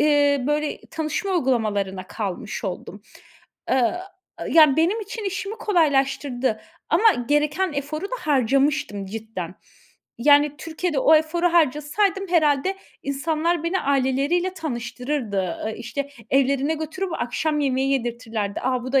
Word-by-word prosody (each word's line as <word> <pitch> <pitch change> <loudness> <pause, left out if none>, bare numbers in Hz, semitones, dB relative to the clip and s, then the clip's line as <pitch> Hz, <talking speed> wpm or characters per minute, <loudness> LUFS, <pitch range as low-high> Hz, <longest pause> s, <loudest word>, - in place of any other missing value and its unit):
ııı, 285 -3 +3
böyle 300 0 -1
tanışma 320 +5 -2
uygulamalarına 210 - 0
kalmış 200 -1 -5
oldum. 195 +1 -6 0.7
Aaa, 260 +6 +2 0.5
ya, 305 -4 +6
benim 355 +8 +2
için 435 +2 -6
işimi 395 +2 -3
kolaylaştırdı 275 - +1 0.3
ama 415 +6 +5 0.2
gereken 300 +4 +1
eforu 295 +5 -3
da - - -3
harcamıştım 270 -6 +1
cidden. 195 -4 -6 0.6
Yani, 290 +2 +5
Türkiye'de 325 -1 -2
o 315 - +6
eforu 315 +3 +2
harcasaydım 340 +5 +1
herhâlde 320 +1 +2 0.3
insanlar 315 +4 -1
beni 360 +3 0
aileleriyle 280 +7 +1
tanıştırırdı. 240 - -3
Iıı, 220 - -3
işte, 255 +5 -5 0.2
evlerine 275 +3 +2
götürüp 330 +4 -4
akşam 300 +4 -1
yemeği 270 -1 +1
yedirtirlerdi. 230 -5 -2
"A, 255 -1 0
bu 255 - -5
da 270 - +5
285 Hz, 120 wpm, -23 LUFS, 250-325 Hz, 0.7 s, ya